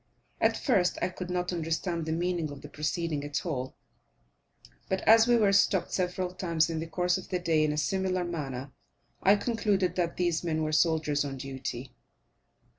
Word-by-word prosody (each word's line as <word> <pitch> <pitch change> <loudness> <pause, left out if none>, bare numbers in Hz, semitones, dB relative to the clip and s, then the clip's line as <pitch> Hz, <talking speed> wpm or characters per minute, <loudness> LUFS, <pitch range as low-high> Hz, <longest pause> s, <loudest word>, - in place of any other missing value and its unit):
At - - +2
first 190 -10 +2
I 180 - 0
could 180 0 -7
not 180 0 -1
understand 165 0 -2
the - - -1
meaning 170 -1 -1
of 145 0 -10
the 145 - -9
proceeding 150 0 -2
at 145 +3 -3
all; 130 -6 -3 1.1
but, 190 0 0
as 225 +1 +6
we 240 -1 +5
were 205 -3 +3
stopped 190 -2 +3
several 180 0 -1
times 170 -3 0
in 160 - -2
the 165 - -4
course 180 +2 0
of - - -11
the 185 - 0
day 165 -3 +2
in 155 - +1
a 150 - -3
similar 185 +3 0
manner, 140 -6 -5 0.5
I 200 +2 +6
concluded 205 -5 0
that 170 -2 -1
these 175 -2 0
men 160 -2 -1
were 155 - -1
soldiers 155 -2 +2
on 140 -2 -5
duty. 130 -1 -6
170 Hz, 185 wpm, -29 LUFS, 155-185 Hz, 1.1 s, as